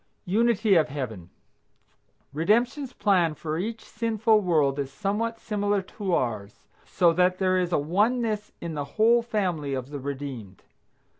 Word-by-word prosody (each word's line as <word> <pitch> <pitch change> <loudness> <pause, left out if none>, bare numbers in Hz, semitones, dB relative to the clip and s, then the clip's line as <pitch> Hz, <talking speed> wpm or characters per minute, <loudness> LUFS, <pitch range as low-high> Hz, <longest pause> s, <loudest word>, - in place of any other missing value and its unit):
UNITY 220 +1 +2
OF 160 - +2
HEAVEN. 115 - -6 1.0
Redemption's 235 - +1
plan 180 -9 +2
for 155 +1 -4
each 220 +4 -4
sinful 220 -1 +1
world 150 -7 +1
is 140 -1 -3
somewhat 215 +6 -2
similar 205 -2 -1
to 185 -1 -2
ours, 110 -5 -3 0.2
so 175 -3 +2
that 180 +1 +2
there 185 -1 +2
is 180 -1 -1
a - - +3
oneness 210 - 0
in 170 -1 -5
the 145 -2 -3
whole 230 +2 +5
family 180 - -2
of 130 +1 -6
the 145 - -5
redeemed. 130 -8 -7
185 Hz, 145 wpm, -26 LUFS, 145-215 Hz, 1.0 s, whole